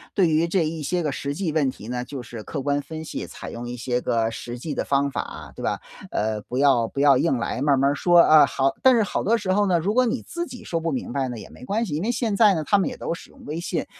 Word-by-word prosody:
对 190 Hz, -4 st, +4 dB
于 160 Hz, +2 st, +2 dB
这 170 Hz, -1 st, +1 dB
一 160 Hz, 0 st, -4 dB
些 175 Hz, +4 st, -1 dB
个 150 Hz, -, 0 dB
实 140 Hz, +1 st, -4 dB
际 170 Hz, -1 st, -1 dB
问 150 Hz, -3 st, +2 dB
题 110 Hz, -4 st, -9 dB
呢， 125 Hz, 0 st, -2 dB
就 130 Hz, 0 st, -7 dB
是 115 Hz, -1 st, -8 dB
客 140 Hz, +6 st, -5 dB
观 145 Hz, +1 st, +1 dB
分 160 Hz, +2 st, -7 dB
析， -, -, -5 dB
采 -, -, -9 dB
用 120 Hz, +1 st, -6 dB
一 125 Hz, -, -5 dB
些 125 Hz, +1 st, -1 dB
个 115 Hz, -2 st, 0 dB
实 120 Hz, +1 st, -6 dB
际 150 Hz, +5 st, -5 dB
的 -, -, -1 dB
方 140 Hz, 0 st, +1 dB
法， -, -, -6 dB
对 -, -, -9 dB
吧？ -, -, -1 dB, 0.3 s
呃， 110 Hz, 0 st, -1 dB
不 125 Hz, -, -6 dB
要 135 Hz, -5 st, +4 dB
不 140 Hz, -, -6 dB
要 140 Hz, -2 st, +5 dB
硬 150 Hz, -7 st, +2 dB
来， 120 Hz, +2 st, -3 dB
慢 140 Hz, -1 st, +3 dB
慢 140 Hz, +1 st, +3 dB
儿 -, -, -1 dB
说， 175 Hz, +4 st, +4 dB
啊 155 Hz, -3 st, +7 dB
好 135 Hz, +1 st, 0 dB
但 260 Hz, -1 st, +6 dB
是 225 Hz, -, +4 dB
好 205 Hz, -, -2 dB
多 230 Hz, +3 st, +3 dB
时 185 Hz, -4 st, -1 dB
候 205 Hz, +1 st, +2 dB
呢， 180 Hz, -2 st, +3 dB
如 185 Hz, +6 st, 0 dB
果 255 Hz, +1 st, +3 dB
你 235 Hz, +2 st, -2 dB
自 345 Hz, 0 st, -5 dB
己 250 Hz, -3 st, -10 dB
说 165 Hz, -, -2 dB
不 165 Hz, 0 st, -2 dB
明 130 Hz, -3 st, -4 dB
白 135 Hz, -1 st, 0 dB
呢， 120 Hz, -2 st, -5 dB
也 -, -, -10 dB
没 -, -, -14 dB
关 215 Hz, -, -1 dB
系， 175 Hz, -, -5 dB
因 150 Hz, -, -1 dB
为 225 Hz, +5 st, 0 dB
现 230 Hz, -3 st, -1 dB
在 205 Hz, -2 st, +5 dB
呢， 160 Hz, -, -1 dB
他 205 Hz, +6 st, +3 dB
们 190 Hz, -, 0 dB
也 -, -, -8 dB
都 -, -, -3 dB
使 170 Hz, -, -10 dB
用 -, -, -17 dB
微 155 Hz, +3 st, -4 dB
信， 170 Hz, -1 st, -2 dB
150 Hz, 325 characters per minute, -24 LUFS, 130-185 Hz, 0.3 s, 啊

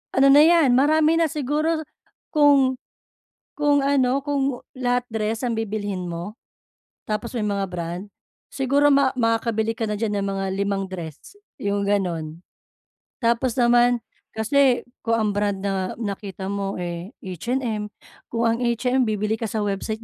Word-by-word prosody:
ano 270 Hz, +1 st, +5 dB
na 290 Hz, -, +8 dB
'yan, 325 Hz, -5 st, +5 dB
marami 310 Hz, +5 st, +4 dB
na 330 Hz, -, +3 dB
siguro 305 Hz, +2 st, -1 dB, 0.5 s
kung 280 Hz, -4 st, +4 dB, 0.8 s
kung 290 Hz, -1 st, +2 dB
ano, 275 Hz, -1 st, +2 dB
kung 275 Hz, -3 st, -1 dB, 0.2 s
lahat 245 Hz, -1 st, +1 dB
dress 220 Hz, +2 st, -2 dB
ang 240 Hz, -2 st, 0 dB
bibilhin 205 Hz, -4 st, -3 dB
mo? 175 Hz, +6 st, -6 dB, 0.6 s
Tapos 230 Hz, +3 st, -4 dB
may 225 Hz, -, -1 dB
mga 200 Hz, -1 st, -1 dB
brand? 175 Hz, +1 st, -4 dB, 0.5 s
Siguro 280 Hz, +2 st, +2 dB
ma 275 Hz, -1 st, +4 dB
makakabili 225 Hz, -1 st, +1 dB
ka 225 Hz, -, -4 dB
na 210 Hz, -, -3 dB
diyan 205 Hz, -3 st, -1 dB
ng -, -, -2 dB
mga 195 Hz, 0 st, -2 dB
limang 200 Hz, 0 st, -1 dB
dress, 170 Hz, -, -9 dB, 0.2 s
'yong 200 Hz, 0 st, -1 dB
gano'n. 170 Hz, -6 st, -1 dB, 0.8 s
Tapos 235 Hz, +1 st, +1 dB
naman 240 Hz, 0 st, +4 dB, 0.4 s
kasi 250 Hz, +3 st, +3 dB, 0.2 s
kung 230 Hz, 0 st, 0 dB
ang 220 Hz, -2 st, +1 dB
brand 205 Hz, -1 st, -1 dB
na 190 Hz, -2 st, -2 dB
nakita 200 Hz, -3 st, -5 dB
mo, 200 Hz, -1 st, -3 dB
eh, 175 Hz, +4 st, -6 dB
H&M, 215 Hz, -, -3 dB, 0.4 s
kung 230 Hz, 0 st, -2 dB
ang 230 Hz, 0 st, +2 dB
H&M 250 Hz, +1 st, +1 dB
bibili 215 Hz, +1 st, -1 dB
ka 225 Hz, -, -2 dB
sa 215 Hz, 0 st, -2 dB
website 205 Hz, +2 st, -3 dB
225 Hz, 145 wpm, -23 LUFS, 200-265 Hz, 0.8 s, na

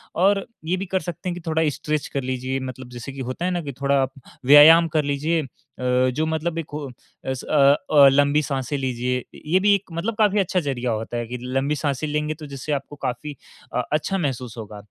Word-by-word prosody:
और 195 Hz, +2 st, +3 dB, 0.2 s
ये 180 Hz, +3 st, 0 dB
भी 195 Hz, -, -4 dB
कर 190 Hz, 0 st, 0 dB
सकते 175 Hz, +1 st, -5 dB
हैं 175 Hz, -, -2 dB
कि 175 Hz, -, -8 dB
थोड़ा 160 Hz, 0 st, +1 dB
स्ट्रेच 150 Hz, +1 st, -3 dB
कर 140 Hz, -, -3 dB
लीजिए, 130 Hz, +1 st, -2 dB
मतलब 130 Hz, -1 st, -7 dB
जैसे 125 Hz, +2 st, -8 dB
कि 135 Hz, -, -10 dB
होता 130 Hz, +8 st, -4 dB
है 185 Hz, -, 0 dB
ना 175 Hz, -1 st, -1 dB
कि 140 Hz, -2 st, -5 dB
थोड़ा 140 Hz, -1 st, +3 dB, 0.4 s
व्यायाम 160 Hz, +4 st, +9 dB
कर 150 Hz, -, +3 dB
लीजिए 145 Hz, +4 st, 0 dB, 0.4 s
अ, 125 Hz, 0 st, +2 dB
जो 155 Hz, +5 st, -1 dB
मतलब 160 Hz, +1 st, -2 dB
एक 165 Hz, -, -2 dB
वो 150 Hz, -2 st, -4 dB, 0.4 s
अ 130 Hz, -, -1 dB
स 130 Hz, -, -7 dB
अ 140 Hz, -2 st, +5 dB, 0.2 s
अ, 145 Hz, -2 st, +8 dB
लम्बी 145 Hz, +2 st, +3 dB
साँसे 140 Hz, -1 st, -2 dB
लीजिए। 125 Hz, -1 st, -2 dB, 0.2 s
ये 180 Hz, +5 st, +3 dB
भी 205 Hz, +1 st, +4 dB
एक 195 Hz, -2 st, -6 dB
मतलब 195 Hz, +7 st, -2 dB
काफ़ी 210 Hz, -2 st, +3 dB
अच्छा 185 Hz, -1 st, +1 dB
जरिया 125 Hz, -5 st, -2 dB
होता 115 Hz, +2 st, -3 dB
है, 120 Hz, -, -2 dB
कि 125 Hz, +2 st, -5 dB
लंबी 135 Hz, +4 st, -1 dB
साँसे 145 Hz, 0 st, -2 dB
लेंगे 150 Hz, +1 st, -1 dB
तो 155 Hz, -1 st, -10 dB
जिससे 140 Hz, +2 st, -6 dB
आपको 140 Hz, +1 st, -4 dB
क -, -, -26 dB
काफ़ी 140 Hz, +4 st, -5 dB, 0.4 s
अ, -, -, 0 dB
अच्छा 155 Hz, +6 st, 0 dB
महसूस 130 Hz, -, -3 dB
होगा। 105 Hz, -2 st, -8 dB
145 Hz, 225 wpm, -23 LUFS, 130-165 Hz, 0.4 s, व्यायाम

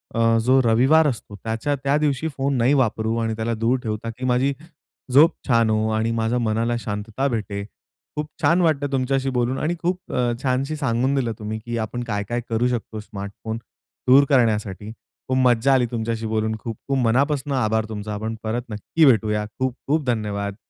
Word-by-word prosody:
अ, 115 Hz, 0 st, +3 dB
जो 130 Hz, +1 st, +5 dB
रविवार 130 Hz, +8 st, +5 dB
असतो 115 Hz, -6 st, -4 dB
त्याच्या 115 Hz, +6 st, -1 dB
त्या 140 Hz, +2 st, +2 dB
दिवशी 150 Hz, 0 st, 0 dB
फोन 135 Hz, 0 st, 0 dB
नाही 125 Hz, +4 st, +3 dB
वापरू 110 Hz, -4 st, +1 dB
आणि 115 Hz, -1 st, -1 dB
त्याला 115 Hz, +1 st, -2 dB
दूर 115 Hz, +3 st, +1 dB
ठेवता, 110 Hz, 0 st, -3 dB
की 125 Hz, +3 st, -6 dB
माझी 130 Hz, +2 st, +2 dB, 0.6 s
झोप 155 Hz, +6 st, +7 dB, 0.2 s
छान 115 Hz, -3 st, +3 dB
हो 110 Hz, 0 st, +1 dB
आणि 115 Hz, +1 st, 0 dB
माझ्या 115 Hz, +2 st, 0 dB
मनाला 115 Hz, +1 st, 0 dB
शांतता 110 Hz, +4 st, -3 dB
भेटे. 105 Hz, -5 st, -3 dB, 0.5 s
खूप 150 Hz, 0 st, -2 dB
छान 175 Hz, +2 st, +4 dB
वाटतं 145 Hz, -4 st, +1 dB
तुमच्याशी 135 Hz, 0 st, 0 dB
बोलून 125 Hz, 0 st, 0 dB
आणि 165 Hz, +3 st, -1 dB
खूप 180 Hz, +1 st, 0 dB, 0.5 s
छानशी 135 Hz, +3 st, 0 dB
सांगून 130 Hz, -1 st, 0 dB
दिलं 125 Hz, -4 st, 0 dB
तुम्ही, 110 Hz, +1 st, -4 dB
की 120 Hz, 0 st, -3 dB
आपण 115 Hz, +2 st, -3 dB
काय 105 Hz, -3 st, -2 dB
काय 120 Hz, 0 st, -1 dB
करू 115 Hz, +2 st, +1 dB
शकतो? 115 Hz, -3 st, -3 dB
स्मार्टफोन 105 Hz, +2 st, -6 dB, 0.5 s
दूर 135 Hz, +3 st, +7 dB
करण्यासाठी. 110 Hz, -5 st, +1 dB, 0.4 s
खूप 130 Hz, 0 st, 0 dB
मज्जा 125 Hz, +1 st, +4 dB
आली 125 Hz, -2 st, +3 dB
तुमच्याशी 115 Hz, -1 st, -2 dB
बोलून, 110 Hz, 0 st, 0 dB
खूप-खूप 120 Hz, +5 st, -4 dB
मनापासून 140 Hz, +4 st, +1 dB
आभार 110 Hz, -4 st, +1 dB
तुमचा 105 Hz, -1 st, -5 dB
आपण 110 Hz, +2 st, -3 dB
परत 115 Hz, +2 st, -2 dB
नक्की 110 Hz, +9 st, +1 dB
भेटूया. 105 Hz, -4 st, +3 dB
खूप-खूप 135 Hz, +4 st, -1 dB
धन्यवाद. 105 Hz, -4 st, -2 dB
120 Hz, 170 wpm, -22 LUFS, 110-135 Hz, 0.6 s, झोप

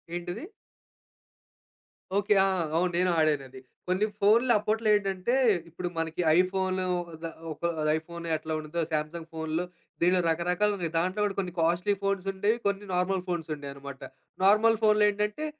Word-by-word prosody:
ఏంటిది? 175 Hz, -, -5 dB, 1.7 s
ఓకె. 205 Hz, +1 st, +3 dB
ఆ! -, -, +2 dB, 0.3 s
అవును. 180 Hz, +1 st, +2 dB
నేను 180 Hz, 0 st, +2 dB
ఆడానది. 140 Hz, -4 st, 0 dB, 0.3 s
కొన్ని 185 Hz, +4 st, +2 dB, 0.2 s
ఫోన్‌లు 230 Hz, +5 st, +5 dB
అప్పట్లో 220 Hz, +1 st, -1 dB
ఏంటంటే, 195 Hz, +4 st, 0 dB, 0.3 s
ఇప్పుడు 175 Hz, +2 st, -5 dB
మనకి 165 Hz, +2 st, -2 dB, 0.2 s
ఐఫోను 185 Hz, 0 st, +1 dB, 0.4 s
ద -, -, -2 dB, 0.3 s
ఒక -, -, -9 dB, 0.4 s
ఐఫోన్ 170 Hz, +1 st, -8 dB
ఎట్లా 155 Hz, +1 st, -5 dB
ఉంటుందో 155 Hz, +2 st, -3 dB
శాంసంగ్ 160 Hz, +2 st, -3 dB
ఫోన్‌లు, 160 Hz, +2 st, -2 dB, 0.4 s
దీనిలో 180 Hz, +1 st, +4 dB
రకరకాలున్నాయి. 180 Hz, +1 st, 0 dB
దాంట్లో 185 Hz, +5 st, 0 dB
కూడా 200 Hz, -, -2 dB
కొన్ని 180 Hz, -3 st, -3 dB
కాస్ట్లీ 175 Hz, +5 st, +2 dB
ఫోన్స్ 195 Hz, -1 st, -1 dB
ఉండేవి, 205 Hz, +4 st, +1 dB
కొన్ని 200 Hz, +1 st, -1 dB
నార్మల్ 180 Hz, 0 st, 0 dB
ఫోన్స్ 165 Hz, -3 st, -3 dB
ఉండేవన్నమాట. 140 Hz, -1 st, -9 dB, 0.4 s
నార్మల్ 215 Hz, +2 st, +5 dB
ఫోన్‌‌‌‌‌‌‌లో 210 Hz, -1 st, +5 dB
ఏంటంటే 210 Hz, +8 st, -2 dB
180 Hz, 135 wpm, -28 LUFS, 165-205 Hz, 1.7 s, ఫోన్‌లు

